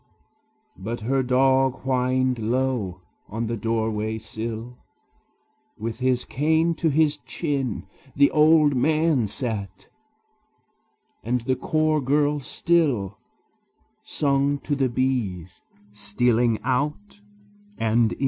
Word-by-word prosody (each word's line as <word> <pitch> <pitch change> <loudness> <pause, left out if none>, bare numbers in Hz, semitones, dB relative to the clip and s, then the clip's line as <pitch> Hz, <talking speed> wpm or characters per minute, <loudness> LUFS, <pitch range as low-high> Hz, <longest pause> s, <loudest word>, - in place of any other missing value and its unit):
But 115 +4 -5
her 135 +5 +1
dog 130 +1 +2
whined 130 -1 0
low; 115 -5 -1 0.3
on 115 +3 -3
the 115 +1 -2
doorway 110 -1 -1
sill, 115 +2 -6 1.0
With 115 +2 -5
his 130 -1 +1
cane 160 +4 +1
to 165 - +1
his 150 0 +2
chin, 140 - -3 0.3
The 140 0 +4
old 155 -2 +5
man 155 -2 +2
sat; 105 -4 -5 1.3
and 125 +1 0
the 130 +3 0
chore 155 +3 +1
girl 145 +2 +1
still 135 - 0 0.8
Sung 140 0 +1
to 145 - -2
the 135 -2 +1
bees 115 -9 -2 0.3
stealing 115 +3 +1
out 150 - -2 0.6
and 115 0 +2
in. - - -11
130 Hz, 105 wpm, -24 LUFS, 115-145 Hz, 1.3 s, old